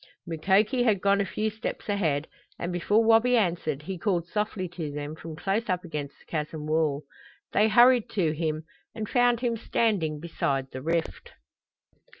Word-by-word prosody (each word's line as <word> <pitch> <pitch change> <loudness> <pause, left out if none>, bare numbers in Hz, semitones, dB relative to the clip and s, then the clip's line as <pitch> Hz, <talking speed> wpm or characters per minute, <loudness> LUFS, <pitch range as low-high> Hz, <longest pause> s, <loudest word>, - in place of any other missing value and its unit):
Mukoki 195 - +2
had 220 -5 +3
gone 200 +1 +3
a - - 0
few 215 0 -1
steps 220 +1 -5
ahead, 165 -8 0 0.3
and 175 +1 -3
before 205 +6 +2
Wabi 230 +2 +5
answered 170 -8 0
he 185 +1 -5
called 175 -5 0
softly 210 -1 -2
to 165 -4 -5
them 145 +1 -5
from 160 0 -8
close 205 +7 -1
up 180 -1 0
against 150 -4 -5
the - - -23
chasm 150 -1 -4
wall. 155 -2 +1 0.5
They 215 - +4
hurried 240 +1 +5
to 175 -7 +2
him 155 0 -2 0.3
and 220 -2 -4
found 245 0 +3
him 240 -2 0
standing 200 -9 0
beside 140 -5 -2
the 130 - -6
rift. 165 +3 -2
180 Hz, 165 wpm, -27 LUFS, 155-215 Hz, 0.5 s, Wabi